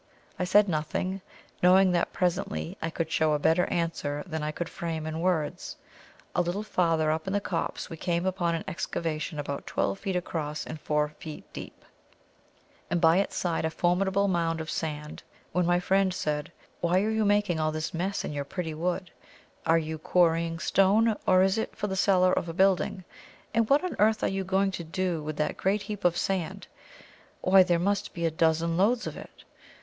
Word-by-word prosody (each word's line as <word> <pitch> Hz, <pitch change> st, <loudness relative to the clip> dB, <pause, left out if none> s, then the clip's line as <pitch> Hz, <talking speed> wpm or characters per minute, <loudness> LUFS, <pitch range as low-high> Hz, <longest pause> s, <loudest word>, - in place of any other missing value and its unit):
I 180 Hz, -, +1 dB
said 205 Hz, +3 st, +5 dB
nothing, 180 Hz, +4 st, -2 dB, 0.4 s
knowing 185 Hz, +1 st, +6 dB
that 175 Hz, -, +1 dB
presently 80 Hz, -, -1 dB
I 160 Hz, -, -1 dB
could 160 Hz, -1 st, -3 dB
show 155 Hz, -1 st, +2 dB
a -, -, +3 dB
better 165 Hz, +4 st, +2 dB
answer 150 Hz, -4 st, -2 dB
than 160 Hz, -4 st, -4 dB
I 150 Hz, -, -2 dB
could 160 Hz, +2 st, -4 dB
frame 165 Hz, -2 st, -4 dB
in 160 Hz, 0 st, -3 dB
words. 170 Hz, -4 st, -1 dB, 0.6 s
A -, -, +4 dB
little 175 Hz, +4 st, -2 dB
farther 165 Hz, -6 st, +1 dB
up 160 Hz, +3 st, -2 dB
in 190 Hz, -, -1 dB
the 205 Hz, -, +2 dB
copse 180 Hz, -4 st, -3 dB
we 165 Hz, -, -8 dB
came 175 Hz, +1 st, -1 dB
upon 175 Hz, -3 st, 0 dB
an 165 Hz, -, -4 dB
excavation 170 Hz, -4 st, -3 dB
about 140 Hz, -1 st, -4 dB
twelve 195 Hz, -, -1 dB
feet 195 Hz, -2 st, -3 dB
across 155 Hz, -4 st, -3 dB
and 155 Hz, -1 st, -7 dB
four 150 Hz, 0 st, 0 dB
deep, 155 Hz, -2 st, -9 dB, 1.0 s
and 175 Hz, -, +1 dB
by 165 Hz, +1 st, +5 dB
its 200 Hz, -, 0 dB
side 170 Hz, -3 st, -1 dB
a 160 Hz, -, +1 dB
formidable 190 Hz, +4 st, +1 dB
mound 165 Hz, -3 st, 0 dB
of 160 Hz, 0 st, -4 dB
sand, 150 Hz, -1 st, -4 dB, 0.3 s
when 180 Hz, 0 st, +1 dB
my 175 Hz, 0 st, +3 dB
friend 190 Hz, 0 st, +2 dB
said, 150 Hz, +1 st, -2 dB, 0.3 s
"Why 180 Hz, +3 st, +2 dB
are 215 Hz, -, 0 dB
you 220 Hz, 0 st, +1 dB
making 205 Hz, -5 st, +2 dB
all 155 Hz, 0 st, +1 dB
this 155 Hz, 0 st, -4 dB
mess 185 Hz, +4 st, -2 dB
in -, -, -4 dB
your 145 Hz, -1 st, -2 dB
pretty 160 Hz, +2 st, -4 dB
wood? 180 Hz, +3 st, -2 dB, 0.6 s
are 165 Hz, -, +5 dB
you 160 Hz, -1 st, -3 dB
quarrying 165 Hz, 0 st, +2 dB
stone, 205 Hz, +6 st, +3 dB
or 185 Hz, 0 st, +6 dB
is 195 Hz, +3 st, +2 dB
it -, -, -4 dB
for -, -, -3 dB
the 190 Hz, -2 st, -2 dB
cellar 185 Hz, -1 st, +4 dB
of 170 Hz, -, -1 dB
a -, -, -4 dB
building? 185 Hz, -1 st, +2 dB, 0.5 s
and 230 Hz, -1 st, +2 dB
what 285 Hz, +5 st, +4 dB
on 365 Hz, -, -3 dB
earth 215 Hz, +1 st, +3 dB
are -, -, +3 dB
you 195 Hz, 0 st, -1 dB
going 195 Hz, +1 st, +1 dB
to 180 Hz, -, -5 dB
do 175 Hz, 0 st, -2 dB
with 150 Hz, 0 st, -5 dB
that 150 Hz, -, -1 dB
great 200 Hz, +2 st, 0 dB
heap 205 Hz, 0 st, -6 dB
of 175 Hz, -1 st, +3 dB
sand? 185 Hz, -4 st, -2 dB, 0.8 s
why, 190 Hz, +1 st, +6 dB
there 175 Hz, -2 st, +3 dB
must 200 Hz, +4 st, -1 dB
be 170 Hz, -1 st, -1 dB
a 165 Hz, -, +1 dB
dozen 165 Hz, +1 st, +1 dB
loads 225 Hz, +6 st, +2 dB
of -, -, -5 dB
it." -, -, -12 dB
175 Hz, 195 wpm, -28 LUFS, 160-190 Hz, 1.0 s, knowing